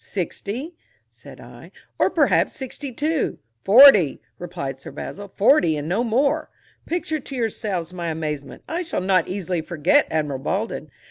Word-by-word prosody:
"Sixty," 210 - -4 0.4
said - - -14
I, - - -13 0.3
"or - - +4
perhaps - - +2
sixty 270 0 -6
two." 300 +4 -1 0.3
"Forty," 210 - +7 0.2
replied 165 -7 -5
Sir - - -9
Basil, 205 0 -7
"forty, 195 - +3
and 145 +1 -5
no 195 +8 0
more." 250 +5 +1 0.4
Picture 320 -2 -2
to 275 0 -9
yourselves 205 -7 -3
my 175 -2 -4
amazement; 155 -3 -5
I 335 +2 -2
shall 335 - -3
not 185 -2 +2
easily 180 -3 -3
forget 155 -2 +2
Admiral 150 -4 -1
Baldwin. 195 - -3
195 Hz, 145 wpm, -22 LUFS, 160-260 Hz, 0.4 s, Forty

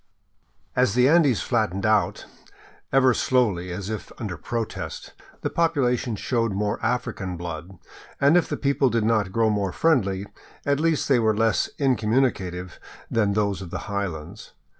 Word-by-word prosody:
As 125 -4 +2
the 125 +1 +5
Andes 145 - +4
flattened 110 -6 0
down, 110 -2 +2 0.8
ever 130 -1 +5
slowly 105 -9 +1
and 90 - -4
as 100 +2 -5
if 110 - -6
under 105 -6 -4
protest, 115 +4 -5 0.3
the - - -1
population 130 -8 +1
showed 115 0 -1
more 105 +1 -2
African 110 -6 -2
blood; 85 +2 -7 0.4
and 140 +4 +5
if 175 - +3
the 150 - -2
people 140 -1 +2
did 115 -1 0
not 110 -4 +1
grow 110 +2 +2
more 100 -3 -1
friendly, 100 -12 +1 0.4
at 140 0 +1
least 165 -1 +1
they 135 -4 +4
were 110 -2 +2
less 110 -3 +2
incommunicative 110 -8 0 0.3
than 105 -3 +2
those 100 -2 0
of 90 - -7
the - - -4
highlands. 95 -1 -5
110 Hz, 155 wpm, -24 LUFS, 95-130 Hz, 0.8 s, the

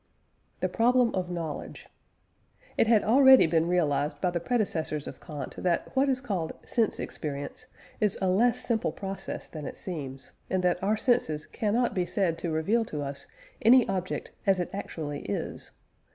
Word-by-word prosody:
THE - - +2
PROBLEM 245 0 +3
OF 180 -2 -2
KNOWLEDGE. 165 -4 -5 0.9
It - - +3
had 220 -2 +5
already 265 +3 +7
been 165 0 +2
realised 150 -5 +1
by 180 - +1
the 175 - -1
predecessors 165 - -1
of - - -9
Kant 145 -5 -6
that 180 +7 -1
what 275 +1 +3
is 260 -1 +1
called 190 - -2
"sense 230 -3 0
experience" 145 -2 -5 0.3
is 210 -3 +1
a 190 - 0
less 225 +6 +3
simple 225 -2 0
process 195 -1 -6
than 155 -3 -7
it - - -7
seems, 140 -7 -5 0.2
and 185 -1 0
that 180 -1 +1
our 210 +3 +1
senses 155 -12 +1
cannot 230 +3 0
be 180 -2 0
said 170 -5 0
to 170 - -3
reveal 190 +9 +1
to 150 -7 -4
us 140 0 -6 0.3
any 245 +2 +6
object 185 0 -3 0.2
as 190 -1 +4
it 175 - -2
actually 155 -7 -5
is. 100 - -4
185 Hz, 165 wpm, -28 LUFS, 160-225 Hz, 0.9 s, already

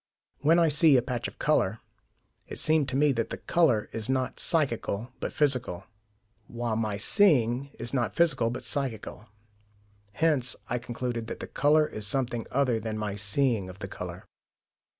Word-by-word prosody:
When 160 +4 +4
I 170 -1 +4
see 150 -1 +5
a - - +3
patch 125 -3 -3
of - - -12
colour, 110 -8 +1 0.7
it - - -8
seemed 155 -3 +3
to 130 - -2
me 145 +1 +4
that 115 -3 -2
the - - -5
colour 150 -12 +2
is 115 +1 -3
not 130 -1 -1
psychical, 120 - 0
but - - -3
physical, 125 - 0 0.6
while 120 -1 -3
my 110 -2 -1
seeing 135 - +2
is 115 0 -3
not 120 -4 -1
physical, 165 -9 +2
but 125 +2 -6
psychical. 120 -3 -3 0.9
Hence 140 -4 +2
I 125 - -2
concluded 120 -1 -4
that - - -6
the - - -5
colour 150 +2 +3
is 105 -8 -4
something 120 0 -1
other 130 -4 +1
than 110 0 -4
my 105 -2 -3
seeing 105 0 0
of 90 - -10
the 95 -1 -6
colour. - - -8
125 Hz, 170 wpm, -27 LUFS, 110-145 Hz, 0.9 s, see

